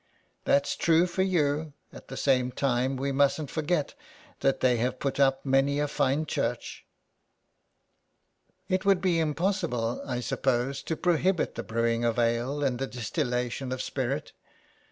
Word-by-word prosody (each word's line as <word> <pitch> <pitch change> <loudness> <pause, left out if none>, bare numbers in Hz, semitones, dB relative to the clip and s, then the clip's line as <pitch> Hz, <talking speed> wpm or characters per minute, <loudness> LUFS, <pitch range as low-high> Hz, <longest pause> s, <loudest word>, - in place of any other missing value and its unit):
That's 140 0 +2
true 165 +1 +3
for 180 +1 -2
you; 155 -5 +1 0.2
at - - -12
the - - -7
same 130 -2 +2
time 130 0 0
we 140 +2 -1
musnt 140 +1 +1
forget 155 -1 -1 0.5
that 135 - +1
they 125 -2 +3
have 125 +3 -1
put 140 +1 -2
up 135 0 +3
many 135 +1 +2
a 145 - +1
fine 145 +1 0
church." 120 -5 -3 0.9
" 185 0 -46
It 185 0 0
would 195 -2 +4
be 180 -3 +1
impossible, 160 - -1
I 125 -2 -3
suppose, 130 +2 0
to 160 - -2
prohibit 180 0 +1
the - - -4
brewing 115 +1 0
of 115 -1 +1
ale 120 +5 0
and 125 -3 0
the 135 - -2
distillation 125 0 -2
of 130 - -3
spirit." - - -3
140 Hz, 155 wpm, -28 LUFS, 125-160 Hz, 0.9 s, would